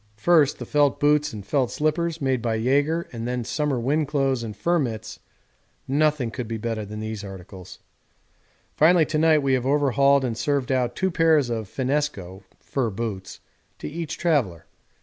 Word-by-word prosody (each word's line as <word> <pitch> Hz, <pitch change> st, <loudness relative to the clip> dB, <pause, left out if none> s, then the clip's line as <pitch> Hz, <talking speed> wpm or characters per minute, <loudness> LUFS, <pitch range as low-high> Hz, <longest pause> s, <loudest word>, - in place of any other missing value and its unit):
First 150 Hz, +3 st, +3 dB
the -, -, -7 dB
felt 145 Hz, -2 st, +2 dB
boots 150 Hz, 0 st, +2 dB
and 105 Hz, -4 st, -8 dB
felt 130 Hz, +1 st, 0 dB
slippers 160 Hz, +2 st, -1 dB
made 130 Hz, -3 st, 0 dB
by 115 Hz, -1 st, -1 dB
Jaeger 145 Hz, +8 st, +1 dB
and 115 Hz, 0 st, -5 dB
then 125 Hz, 0 st, -2 dB
summer 145 Hz, +1 st, -1 dB
wind 145 Hz, +5 st, 0 dB
clothes 135 Hz, -4 st, 0 dB
and 110 Hz, -3 st, -7 dB
fur 170 Hz, +9 st, +1 dB
mits 110 Hz, -5 st, -4 dB, 0.7 s
nothing 145 Hz, -3 st, +1 dB
could 125 Hz, 0 st, -5 dB
be 115 Hz, 0 st, -4 dB
better 110 Hz, 0 st, -3 dB
than 105 Hz, +1 st, -7 dB
these 110 Hz, -1 st, -5 dB
articles. 95 Hz, -1 st, -10 dB, 1.0 s
Finally 165 Hz, +1 st, +5 dB
to 155 Hz, 0 st, -1 dB
night 155 Hz, -2 st, +4 dB
we 135 Hz, -1 st, +2 dB
have 130 Hz, 0 st, 0 dB
overhauled 140 Hz, -1 st, +3 dB
and 120 Hz, -3 st, -2 dB
served 140 Hz, +1 st, -1 dB
out 125 Hz, -2 st, 0 dB
two 190 Hz, 0 st, 0 dB
pairs 160 Hz, -7 st, +3 dB
of 110 Hz, -4 st, -4 dB
finnesko 130 Hz, -9 st, -2 dB, 0.2 s
(fur 130 Hz, -4 st, -2 dB
boots) 100 Hz, -2 st, -6 dB, 0.4 s
to -, -, -7 dB
each 165 Hz, 0 st, -5 dB
traveller. 135 Hz, -, 0 dB
135 Hz, 170 wpm, -24 LUFS, 115-150 Hz, 1.0 s, Finally